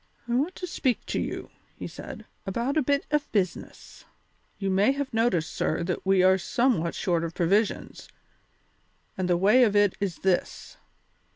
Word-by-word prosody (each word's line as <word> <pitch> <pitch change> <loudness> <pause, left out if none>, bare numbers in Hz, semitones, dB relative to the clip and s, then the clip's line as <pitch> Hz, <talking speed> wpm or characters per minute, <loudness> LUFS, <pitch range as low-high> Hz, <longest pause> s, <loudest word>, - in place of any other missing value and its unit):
"I 235 - -2
want 290 +9 0
to 360 - -5
speak 260 -7 -1
to - - -2
you," - - -5 0.2
he - - -7
said, - - -9 0.2
"about 235 +8 -1
a 310 - +3
bit 280 +2 0
of 295 -1 0
business." 185 -5 -3 0.5
"You 195 -2 -2
may 200 +7 +3
have 275 -2 -4
noticed, 225 -8 +1
sir, 160 - -1
that 180 0 -3
we 190 -1 +4
are 190 0 +5
somewhat 230 -8 0
short 170 -3 0
of 165 0 -5
provisions, 200 +5 0 1.1
and 185 -2 -2
the 175 - +3
way 210 +8 +5
of 210 -4 +2
it 205 -2 +4
is 195 -5 -2
this. 185 -2 -1
200 Hz, 170 wpm, -26 LUFS, 180-255 Hz, 1.1 s, are